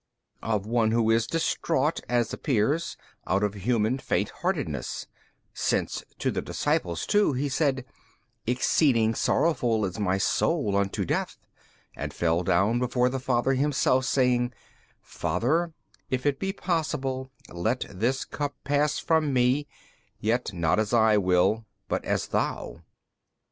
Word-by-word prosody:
B. -, -, -8 dB
Of 105 Hz, -3 st, 0 dB
one 115 Hz, 0 st, +2 dB
who 115 Hz, 0 st, +2 dB
is 115 Hz, 0 st, +2 dB
distraught 165 Hz, -2 st, 0 dB
(as 120 Hz, -2 st, +1 dB
appears) 140 Hz, +4 st, 0 dB, 0.3 s
out 95 Hz, +2 st, +1 dB
of 105 Hz, -1 st, 0 dB
human 110 Hz, +4 st, 0 dB
faint -, -, 0 dB
heartedness: -, -, -3 dB, 0.5 s
since -, -, -1 dB
to -, -, 0 dB
the -, -, -2 dB
disciples 85 Hz, 0 st, -1 dB
too 205 Hz, -7 st, +3 dB
He 135 Hz, +3 st, -1 dB
said, 135 Hz, -2 st, 0 dB, 0.6 s
Exceeding 125 Hz, -2 st, +3 dB
sorrowful 115 Hz, -6 st, +1 dB
is 95 Hz, +3 st, -5 dB
My 95 Hz, -2 st, +1 dB
Soul 105 Hz, +2 st, +1 dB
unto 100 Hz, -1 st, 0 dB
death, -, -, -2 dB, 0.6 s
and -, -, -5 dB
fell 85 Hz, 0 st, +1 dB
down 95 Hz, +6 st, +2 dB
before 125 Hz, 0 st, +1 dB
the 135 Hz, +1 st, -3 dB
Father 130 Hz, +1 st, +1 dB
Himself 130 Hz, -1 st, +2 dB
saying, 125 Hz, -2 st, +2 dB, 0.5 s
Father, 165 Hz, +8 st, 0 dB, 0.4 s
if 130 Hz, +1 st, -2 dB
it 145 Hz, -2 st, +1 dB
be 195 Hz, -, -1 dB
possible, 145 Hz, -8 st, -2 dB, 0.2 s
let 110 Hz, +9 st, -1 dB
this 115 Hz, +8 st, -1 dB
Cup 145 Hz, -1 st, -4 dB
pass 145 Hz, +1 st, +1 dB
from 160 Hz, -3 st, +1 dB
Me, 130 Hz, +3 st, +2 dB, 0.5 s
yet 115 Hz, +1 st, 0 dB
not 85 Hz, -1 st, +1 dB
as 110 Hz, +1 st, -1 dB
I 110 Hz, -2 st, +5 dB
will 95 Hz, +4 st, +2 dB, 0.2 s
but -, -, -1 dB
as -, -, 0 dB
THOU. -, -, -2 dB
125 Hz, 140 wpm, -27 LUFS, 105-140 Hz, 0.6 s, I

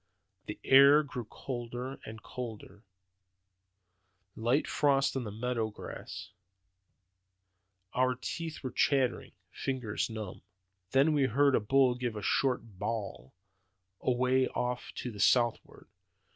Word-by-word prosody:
The 105 Hz, -, -6 dB
air 140 Hz, +3 st, +7 dB
grew 125 Hz, -5 st, -6 dB
colder 125 Hz, +2 st, -6 dB
and 110 Hz, +1 st, -9 dB
colder; 110 Hz, -4 st, -8 dB, 1.5 s
light 120 Hz, +6 st, +1 dB
frost 140 Hz, -2 st, +2 dB
on 130 Hz, -3 st, -2 dB
the 105 Hz, -, -5 dB
meadow 115 Hz, 0 st, -2 dB
grass; 105 Hz, -, -8 dB, 1.6 s
our 130 Hz, 0 st, +2 dB
teeth 160 Hz, +5 st, -5 dB
were 130 Hz, -, -3 dB
chattering, 130 Hz, -3 st, +1 dB, 0.2 s
fingers 125 Hz, -6 st, -2 dB
numb. 110 Hz, -4 st, -6 dB, 0.5 s
"Then 135 Hz, +6 st, +4 dB
we 145 Hz, -3 st, +3 dB
heard 140 Hz, +3 st, +3 dB
a -, -, +4 dB
bull 130 Hz, +4 st, +3 dB
give 120 Hz, -2 st, -3 dB
a 105 Hz, -, -5 dB
short 115 Hz, -5 st, 0 dB
bawl, 105 Hz, -, -4 dB, 0.7 s
away 130 Hz, +1 st, +2 dB
off 125 Hz, 0 st, -3 dB
to 125 Hz, -, -4 dB
the 105 Hz, -, -10 dB
southward. 120 Hz, +3 st, +2 dB
125 Hz, 115 wpm, -31 LUFS, 110-135 Hz, 1.6 s, air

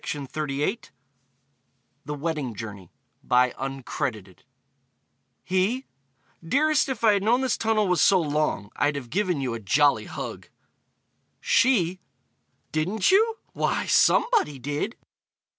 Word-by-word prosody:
THE 145 Hz, -, -3 dB, 1.3 s
WEDDING 145 Hz, -6 st, -3 dB
JOURNEY 100 Hz, -4 st, -8 dB, 2.6 s
He: 195 Hz, +9 st, 0 dB, 0.6 s
Dearest, 290 Hz, -, +2 dB
if 255 Hz, -4 st, -4 dB
I 220 Hz, -2 st, +6 dB
had 200 Hz, -, +1 dB
known 235 Hz, +5 st, +2 dB
this 260 Hz, -4 st, +1 dB
tunnel 220 Hz, -2 st, +1 dB
was 180 Hz, -3 st, +2 dB
so 190 Hz, -, +5 dB
long, 150 Hz, -9 st, -1 dB
I'd 145 Hz, 0 st, +1 dB
have 125 Hz, -4 st, -7 dB
given 180 Hz, -5 st, 0 dB
you 130 Hz, -3 st, -2 dB
a 115 Hz, -, -4 dB
jolly 140 Hz, +8 st, +2 dB
hug. -, -, -7 dB, 0.9 s
She: 255 Hz, -, +2 dB, 0.7 s
Didn't 185 Hz, -, +1 dB
you? 445 Hz, +3 st, +3 dB, 0.2 s
Why, -, -, -1 dB
somebody 455 Hz, -, +3 dB
did! 145 Hz, -, -3 dB
175 Hz, 105 wpm, -25 LUFS, 145-225 Hz, 2.6 s, I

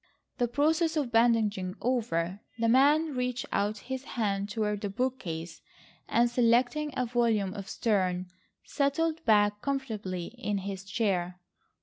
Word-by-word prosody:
The 245 Hz, -, +2 dB
process 315 Hz, +5 st, +1 dB
of 275 Hz, -6 st, -1 dB
bandaging 220 Hz, -5 st, +2 dB
over, 200 Hz, -7 st, -1 dB, 0.2 s
the 230 Hz, 0 st, +1 dB
man 290 Hz, +6 st, +4 dB
reached 250 Hz, -1 st, -2 dB
out 205 Hz, +1 st, 0 dB
his 260 Hz, +1 st, -4 dB
hand 200 Hz, -5 st, -2 dB
toward 210 Hz, -1 st, -1 dB
the 205 Hz, -, -2 dB
bookcase 190 Hz, -8 st, -3 dB, 0.5 s
and, 240 Hz, +1 st, +4 dB
selecting 245 Hz, +5 st, +2 dB
a 250 Hz, -, +1 dB
volume 230 Hz, -5 st, +1 dB
of 200 Hz, -2 st, -7 dB
Sterne, 185 Hz, -5 st, 0 dB, 0.4 s
settled 320 Hz, +3 st, 0 dB
back 210 Hz, -2 st, +3 dB
comfortably 215 Hz, -10 st, -3 dB
in 210 Hz, -5 st, -1 dB
his 195 Hz, 0 st, -5 dB
chair. 185 Hz, -4 st, -1 dB
230 Hz, 130 wpm, -29 LUFS, 200-255 Hz, 0.5 s, man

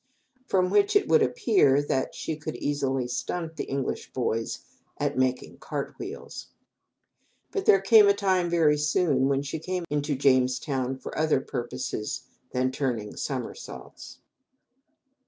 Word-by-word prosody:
From 185 Hz, -3 st, +2 dB
which 205 Hz, -, +3 dB
it 410 Hz, -, +4 dB
would 470 Hz, -, +5 dB
appear 415 Hz, -, +3 dB
that 135 Hz, -2 st, -1 dB
she 160 Hz, -, -3 dB
could 155 Hz, +1 st, -6 dB
easily 135 Hz, -3 st, -1 dB
"stunt" 165 Hz, +6 st, -4 dB
the -, -, -4 dB
English 135 Hz, -1 st, -3 dB
boys 115 Hz, -3 st, -2 dB, 0.4 s
at -, -, -1 dB
"making 130 Hz, 0 st, -1 dB
cart -, -, -4 dB
wheels." -, -, -7 dB, 1.0 s
But 395 Hz, -2 st, -3 dB
there 195 Hz, -, +7 dB
came 210 Hz, +1 st, +7 dB
a 200 Hz, -, +6 dB
time 190 Hz, -3 st, +1 dB
very 155 Hz, -3 st, +3 dB
soon 150 Hz, -3 st, +2 dB
when 140 Hz, 0 st, +1 dB
she 145 Hz, +3 st, -4 dB
came 180 Hz, +2 st, -3 dB
into 145 Hz, 0 st, 0 dB
Jamestown 130 Hz, 0 st, +1 dB
for -, -, -8 dB
other 155 Hz, -3 st, +2 dB
purpose 120 Hz, -4 st, -4 dB, 0.3 s
than 130 Hz, 0 st, 0 dB
turning 120 Hz, -6 st, -3 dB
somersaults. 135 Hz, -, -6 dB
145 Hz, 135 wpm, -27 LUFS, 130-180 Hz, 1.0 s, there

